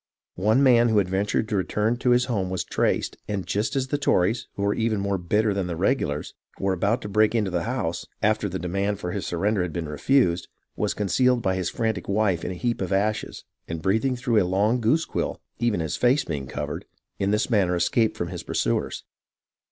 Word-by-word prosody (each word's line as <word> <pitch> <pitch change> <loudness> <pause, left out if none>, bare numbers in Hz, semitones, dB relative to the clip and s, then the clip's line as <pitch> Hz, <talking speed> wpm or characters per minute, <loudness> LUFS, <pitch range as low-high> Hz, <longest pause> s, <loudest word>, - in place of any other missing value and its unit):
One 110 +8 +3
man 120 -3 +5
who 110 - +2
had 100 -3 +3
ventured 100 +3 0
to 105 - -1
return 105 +4 0
to 125 - 0
his 125 0 +4
home 100 -7 -1
was 95 -1 -2
traced, - - 0
and, 100 -3 -3
just 105 +7 -1
as 135 -1 -1
the 145 - 0
Tories, 110 -2 +1
who 100 - -3
were 100 0 +2
even 110 -2 0
more 100 -1 -1
bitter 105 +4 +1
than 95 -2 -1
the 85 - -3
regulars, 85 - -1 0.3
were 95 -1 +1
about 105 +7 0
to - - -4
break 110 +2 +3
into 105 -4 +1
the 90 +1 -1
house, 110 -9 -2
after 105 -1 +1
the 95 - -3
demand 100 +3 -1
for 90 -3 -4
his 100 +1 -3
surrender 100 +4 0
had 90 -1 -2
been 85 -3 -3
refused, 90 - +2 0.3
was - - -1
concealed 120 +5 +2
by 95 - +2
his 95 -1 -1
frantic 110 -6 -2
wife 100 -4 +1
in - - -2
a 90 - -4
heap 120 +5 -2
of 95 - -2
ashes, 105 +2 -1 0.2
and 85 -1 -5
breathing 110 +7 +1
through 120 -3 +2
a - - +3
long 100 +7 +1
goose 150 +9 +2
quill, - - -3 0.2
even 115 -7 +1
his 80 -2 -2
face 125 +3 +3
being 70 -5 -4
covered, 75 +2 -5 0.3
in 100 - +1
this 105 +4 0
manner 95 -5 +3
escaped 110 +6 +1
from 85 - -3
his 90 -2 -5
pursuers. - - -1
100 Hz, 215 wpm, -25 LUFS, 90-115 Hz, 0.3 s, man